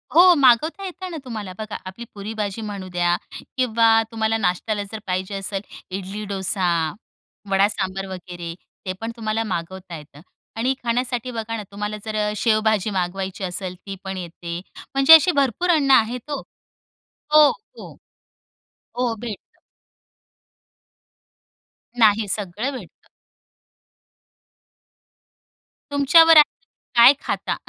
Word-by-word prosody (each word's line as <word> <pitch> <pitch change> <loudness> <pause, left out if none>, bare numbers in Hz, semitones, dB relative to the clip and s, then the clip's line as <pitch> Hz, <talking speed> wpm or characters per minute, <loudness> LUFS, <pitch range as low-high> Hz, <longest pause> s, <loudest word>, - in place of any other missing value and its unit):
हो 360 +2 +8
मागवता 285 - +3
येतं 370 0 -7
ना 330 - -5
तुम्हाला. 215 -6 -6
बघा, 215 -1 -6
आपली 190 +6 -8
पुरीभाजी 210 0 -4
म्हणू 200 -3 -6
द्या 175 -1 +1 0.4
किंवा 230 -3 +3 0.2
तुम्हाला 225 0 0
नाश्त्याला 205 +2 -1
जर 220 - -6
पाहिजे 185 +2 -2
असेल, 195 0 -3 0.4
इडली-डोसा, 195 -1 -2 0.8
वडा-सांबर 195 -1 0
वगैरे, 175 -2 -7 0.3
ते 185 - -2
पण 225 +1 -3
तुम्हाला 220 0 -1
मागवता 185 -2 -5
येतं 150 -1 -14 0.4
आणि 250 +4 +1
खाण्यासाठी 245 +1 -1
बघा 225 -1 -4
ना, 215 - -5
तुम्हाला 210 +1 -4
जर 215 -1 -4
अ, - - -2
शेवभाजी 215 -2 +2
मागवायची 190 0 -3
असेल, 185 0 -4
ती 195 +2 -9
पण 190 -1 -5
येते. 170 -1 -6 0.3
म्हणजे 275 +3 +7
अशी 320 +2 +8
भरपूर 275 +7 -1
अन्न 290 -5 +3
आहेत 245 +2 +2
हो. 285 - -2 0.9
हो, 305 -1 +8
हो. 475 - -11 1.1
हो, 245 -2 +1
भेटतं. 225 -4 -9 2.4
नाही, 215 -2 +4
सगळं 210 +6 -2
भेटतं. 190 -9 -15 2.8
तुमच्यावर 320 +3 +6
आहे 300 - +11 0.5
काय 240 +3 +9
खाता, - - -2
215 Hz, 115 wpm, -22 LUFS, 190-245 Hz, 2.8 s, आहे